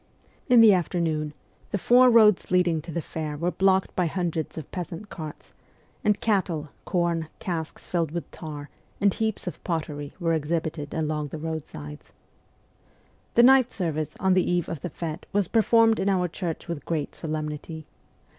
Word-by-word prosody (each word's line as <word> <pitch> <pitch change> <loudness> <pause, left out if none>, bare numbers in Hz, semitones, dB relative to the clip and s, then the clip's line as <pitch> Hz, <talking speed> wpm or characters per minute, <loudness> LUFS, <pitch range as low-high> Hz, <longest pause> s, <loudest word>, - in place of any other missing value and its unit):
In 245 -2 +8
the 220 -3 +8
afternoon, 165 -4 0 0.4
the - - -1
four 250 +7 +6
roads 215 -5 +5
leading 175 -3 +2
to 170 - -9
the 165 0 -3
fair 155 -2 -4
were 170 +4 0
blocked 190 +2 +2
by 180 -2 +2
hundreds 165 -3 -2
of 155 - -7
peasant 180 +3 -6
carts, 155 -3 -8 0.5
and 210 -1 +2
cattle, 180 -8 0 0.2
corn, 170 -3 0
casks 165 -4 -5
rilled 165 -3 +1
with 170 +2 -5
tar, 150 -3 -8 0.3
and 200 -1 +3
heaps 220 -2 -2
of 180 - -6
pottery 150 -4 -3
were 165 -2 +1
exhibited 155 -1 -2
along 155 -1 -1
the 155 - -7
roadsides. 150 - -7 1.2
The 235 - +7
night 260 -1 +6
service 155 -5 -3
on 190 -1 +3
the 185 -1 +4
eve 175 -1 +1
of 165 -4 -5
the 180 - -4
fete 165 +2 -6
was 200 -3 +2
per 225 - +3
formed 225 0 +4
in 200 - +1
our 185 -2 +2
church 170 -1 -5
with 170 -4 -4
great 155 -4 -2
solemnity. 155 0 -5
170 Hz, 165 wpm, -26 LUFS, 155-190 Hz, 1.2 s, In